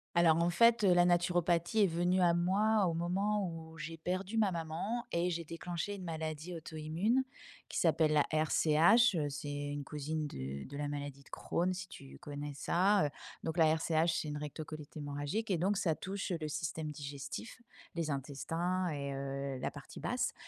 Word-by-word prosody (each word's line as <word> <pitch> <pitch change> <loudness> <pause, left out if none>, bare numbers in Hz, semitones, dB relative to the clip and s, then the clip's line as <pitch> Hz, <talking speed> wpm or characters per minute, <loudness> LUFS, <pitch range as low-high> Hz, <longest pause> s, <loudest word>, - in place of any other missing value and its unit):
Alors, 165 -2 +6
en 170 - +3
fait, 230 +6 +5
heu, 185 -3 +6
la 175 - +6
naturopathie 175 +3 +3
est 195 - +5
venue 175 +2 +1
à 175 -1 +5
moi 195 +4 +3
au 165 - 0
moment 195 +4 0
où 165 -1 -8
j'ai 165 +1 -5
perdu 185 +6 -2
ma 205 -3 +3
maman 170 +8 -3
et 170 +1 +1
j'ai 170 -1 -2
déclenché 170 +4 -4
une 190 -2 -7
maladie 160 +1 -4
auto-immune 165 +10 0 0.5
qui - - -4
s'appelle 160 -2 +3
la 150 -2 +4
RCH, 160 +8 +5
heu, 150 -3 0
c'est 140 +1 -6
une 145 0 -3
cousine 150 +2 -3
de 70 - -5
de 140 - -7
la 145 0 -2
maladie 145 -1 -5
de - - -20
Crohn 180 +2 -1
si 185 0 -6
tu 135 -5 -11
connais 145 -1 -6
ça, 190 +6 +3
heu, 145 - 0 0.3
donc 160 +1 -3
la 160 -1 +6
RCH, 160 0 +1
c'est - - -5
une 150 - -3
recto-colite 150 0 -7
hémorragique 145 +9 -3
et 170 - +1
donc 195 +3 +2
ça 165 -4 +2
touche 195 +3 -4
le 155 - -2
système 155 +1 -3
digestif, 140 - -7 0.3
les 165 -2 -2
intestins 165 +7 -1
et 140 -2 -3
heu, 135 -1 -3
la - - -1
partie - - -10
basse - - -1
165 Hz, 185 wpm, -34 LUFS, 150-180 Hz, 0.5 s, Alors